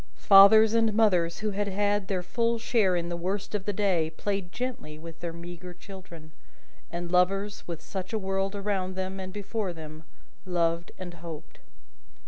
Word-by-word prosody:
Fathers 210 +2 +8
and 225 -2 +2
mothers 180 -6 +3
who 215 -1 -1
had 205 +1 -1
had 205 0 0
their 185 -2 -1
full 230 +6 0
share 225 -5 +2
in 170 0 -2
the 175 - -2
worst 190 +4 -3
of 200 -2 -2
the 205 - 0
day, 185 -6 +1
played 195 +2 -3
gently 245 -12 -5
with 165 +1 -10
their 170 -1 -4
meagre 175 +1 -9
children; 175 -4 -12 0.6
and 175 0 -5
lovers, 195 +3 +1
with 170 -2 -6
such 190 -2 -6
a 225 - 0
world 195 0 -1
around 195 -2 -2
them 190 +1 -4
and 185 0 -6
before 205 -1 -3
them, 155 -1 -10 0.4
loved 170 -2 0
and 180 -2 -7
hoped. 165 -2 -9
190 Hz, 170 wpm, -28 LUFS, 170-205 Hz, 0.6 s, Fathers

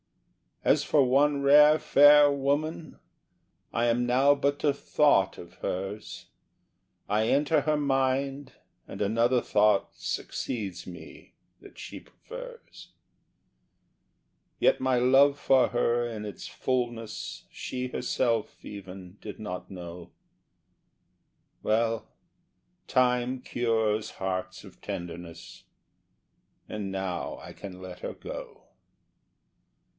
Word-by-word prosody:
As - - +3
for 145 - +3
one 140 +3 +3
rare 150 +2 +7
fair 145 0 +7
woman, 145 +3 -2 0.7
I 115 - +1
am 120 +1 +2
now 135 +4 +5
but 140 0 -1
a 145 -2 +3
thought 140 -9 +2
of 85 - -12
hers, 95 +3 -5 0.8
I 110 +2 +2
enter 150 +3 +2
her 150 +1 +1
mind 135 0 0 0.3
and - - -8
another 115 +4 +2
thought 105 -1 +2
succeeds 100 -7 -4
me 90 -1 -12 0.3
that - - -15
she - - -8
prefers; - - -12 1.7
Yet - - +3
my 130 -1 +1
love 135 +3 +5
for 135 -1 +4
her 120 0 +1
in 110 -2 -6
its 105 -4 -7
fulness 120 -4 -3
she 125 0 -4
herself 120 -3 -1
even 95 -2 -10
did 105 - -8
not 90 -4 -6
know; 90 -2 -9 1.5
Well, 115 +1 0 0.8
time 125 0 +1
cures 110 -3 0
hearts 95 -1 -4
of - - -15
tenderness, 85 -1 -8 1.1
and 105 -2 -4
now 95 -2 -3
I - - -10
can 95 -2 -10
let 90 -1 -9
her - - -5
go. - - -8
120 Hz, 105 wpm, -28 LUFS, 100-140 Hz, 1.7 s, rare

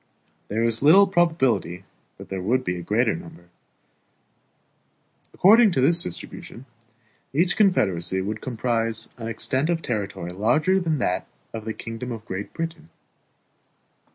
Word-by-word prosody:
There 110 +3 -1
is 115 -1 0
little 175 +8 +7
probability 160 - +1 0.3
that - - -12
there 95 -1 -4
would 125 +7 +1
be 90 - -2
a 90 - -6
greater 110 +4 +1
number. 85 +1 -12 1.8
According 220 +4 +6
to 135 - +1
this 165 +6 +3
distribution, 115 - -7 0.7
each 170 +5 +2
confederacy 95 - +2
would 105 +3 -4
comprise 115 -2 -1
an 115 - -5
extent 130 +6 0
of 165 -1 -1
territory 100 -6 -3
larger 150 - +2
than 165 -4 -1
that 90 -8 -1 0.3
of 110 -1 -6
the 110 - -3
kingdom 115 +2 -6
of 115 -2 -7
Great 95 +2 -5
Britain. 165 0 -6
115 Hz, 135 wpm, -24 LUFS, 105-160 Hz, 1.8 s, little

